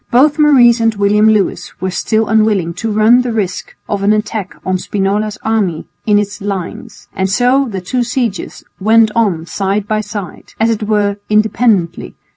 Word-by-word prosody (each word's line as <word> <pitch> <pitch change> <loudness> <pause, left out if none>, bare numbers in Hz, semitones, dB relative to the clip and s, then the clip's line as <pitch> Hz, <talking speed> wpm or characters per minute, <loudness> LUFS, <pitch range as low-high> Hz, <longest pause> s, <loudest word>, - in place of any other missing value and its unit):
Both 290 +5 +3
Maurice 250 -6 +5
and 225 -1 +1
William 210 +2 +3
Lewis 215 -3 -1
were 185 0 -2
still 220 +4 0
unwilling 210 -6 +1
to 225 +6 -4
run 220 +4 +4
the 250 -1 -3
risk 195 -5 -3
of 205 -1 -2
an 205 +2 +3
attack 215 -1 -3
on 185 -1 0
Spinola's 205 +2 -2
army 205 -7 -1 0.2
in 210 -1 +4
its 205 0 -2
lines, 195 -3 -6
and 190 0 -1
so 250 +6 +2
the 195 -3 -5
two 245 +8 -2
sieges 235 -4 -3 0.2
went 220 +2 +4
on 195 -8 0
side 195 +3 -2
by 215 0 0
side, 205 -4 -8
as 225 +1 +2
it 220 - -2
were 205 -1 0
independently. 215 -4 +1
210 Hz, 170 wpm, -14 LUFS, 195-225 Hz, 0.2 s, Maurice